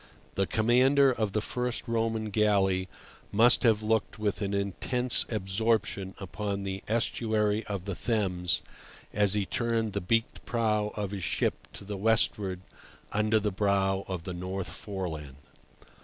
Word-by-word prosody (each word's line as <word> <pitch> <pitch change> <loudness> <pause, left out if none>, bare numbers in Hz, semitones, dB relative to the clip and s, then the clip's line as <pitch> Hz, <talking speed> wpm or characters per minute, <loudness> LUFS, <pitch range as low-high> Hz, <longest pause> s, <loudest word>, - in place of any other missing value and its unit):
The 95 -1 0
commander 130 +5 +4
of 110 -5 -1
the 110 - +1
first 125 +1 -2
Roman 115 -2 -1
galley 95 -3 +2 0.4
must 115 +4 +5
have 110 -3 +3
looked 110 +1 0
with 105 -1 -1
an 100 -1 -1
intense 100 +5 0
absorption 105 -1 0
upon 100 +1 -4
the 95 0 -4
estuary 110 -1 0
of 100 -3 -4
the 100 - -3
Thames 90 -4 0 0.5
as 105 -1 +2
he 105 -2 +1
turned 115 -1 0
the 100 - -1
beaked 115 +5 0
prow 105 -3 0
of 100 -2 -3
his 100 -3 -4
ship - - -1
to - - -10
the 100 0 -5
westward 100 -3 +1 0.5
under 105 +1 +2
the 105 0 -1
brow 95 -1 +1
of 90 -3 -4
the 90 - -5
North 95 +1 -4
Foreland. 80 -9 -5
105 Hz, 145 wpm, -29 LUFS, 95-110 Hz, 0.5 s, must